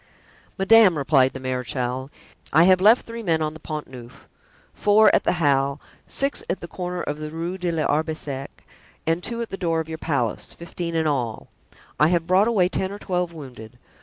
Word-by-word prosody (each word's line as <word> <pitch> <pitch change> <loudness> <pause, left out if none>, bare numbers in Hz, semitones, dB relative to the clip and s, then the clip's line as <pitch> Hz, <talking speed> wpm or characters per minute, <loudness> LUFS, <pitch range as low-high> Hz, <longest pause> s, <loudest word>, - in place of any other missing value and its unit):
"Madame," 195 -3 +6
replied 135 -2 +3
the - - -6
marechal, 125 0 -3 0.4
"I 160 - +6
have 185 0 +5
left 220 +5 +5
three 230 0 -7
men 165 -7 +1
on 155 0 -2
the 160 - -11
Pont 155 -1 -6
Neuf, 125 -1 -13 0.5
four 210 +1 +4
at - - +2
the - - +3
Halle, 140 -4 +1 0.3
six 275 +1 0
at - - -1
the 170 - -8
corner 180 0 -4
of 145 +1 -4
the 155 0 -5
Rue 165 +3 -4
de 180 -2 -2
l'Arbre 160 0 0
Sec 135 -3 -7 0.4
and 165 +2 0
two 235 +2 -3
at 230 - -10
the 195 - -4
door 165 -3 0
of 160 - -4
your 160 0 -6
palace—fifteen 165 +5 -3
in 160 -1 +1
all. 125 -7 -2 0.5
I 150 - +6
have 170 -1 +1
brought 185 +4 +3
away 200 -7 +3
ten 190 +1 -3
or 200 - -6
twelve 180 -3 -2
wounded. 125 -7 -11
165 Hz, 195 wpm, -23 LUFS, 140-185 Hz, 0.5 s, Madame